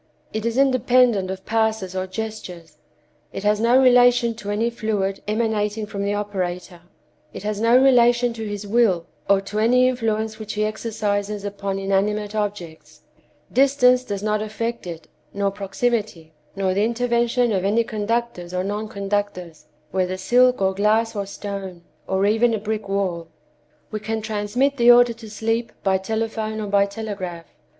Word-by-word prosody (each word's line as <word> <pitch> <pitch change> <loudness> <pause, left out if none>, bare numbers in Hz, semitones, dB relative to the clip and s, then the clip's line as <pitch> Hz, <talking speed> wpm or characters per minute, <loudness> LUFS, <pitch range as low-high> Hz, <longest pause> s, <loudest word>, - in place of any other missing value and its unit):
It 220 +1 -2
is 230 +1 -2
independent 250 -6 +3
of 190 0 -6
passes 220 -4 0
or 185 0 -2
gestures; 185 -7 -7 0.5
it 195 - -6
has 210 0 +2
no 235 +3 +4
relation 245 -2 +5
to 215 -2 -8
any 220 +3 0
fluid 205 -4 -2
emanating 215 -1 -1
from 200 -1 -5
the 200 +1 0
operator; 180 -3 -4 0.5
it - - -8
has 210 0 -3
no 230 +2 +5
relation 245 -2 +4
to 225 -1 -6
his 205 0 -5
will, 205 -6 +2 0.2
or 200 -1 +4
to 205 +2 -4
any 250 +3 +4
influence 220 -3 -1
which 215 -1 -6
he 215 0 0
exercises 210 -2 -2
upon 200 -1 -3
inanimate 205 +2 0
objects; 170 -8 -5 0.5
distance 255 -1 +4
does 205 -4 -5
not 215 0 0
affect 230 0 -4
it, 165 -2 -8 0.3
nor 200 -1 0
proximity, 200 -4 -2 0.2
nor 190 -1 0
the 200 +2 +1
intervention 235 +1 +1
of 190 -3 0
any 215 +4 +2
conductors 215 -5 -3
or 180 - 0
non 205 +2 -3
conductors, 200 -5 -4 0.2
whether 185 0 -1
silk 250 +3 +3
or 190 0 +2
glass 220 +3 +1
or 200 -1 -3
stone, 195 -3 -7 0.2
or 190 +1 +1
even 225 +2 +3
a - - -1
brick 215 0 -4
wall. 185 -4 -1 0.6
We 215 - -3
can 220 +1 -3
transmit 220 +6 0
the 240 -1 +5
order 240 0 +7
to 225 -1 -12
sleep 225 +2 -2
by 190 -1 +2
telephone 220 +1 -3
or 215 - -3
by 200 0 +2
telegraph. 200 -5 -6
210 Hz, 160 wpm, -22 LUFS, 195-230 Hz, 0.6 s, order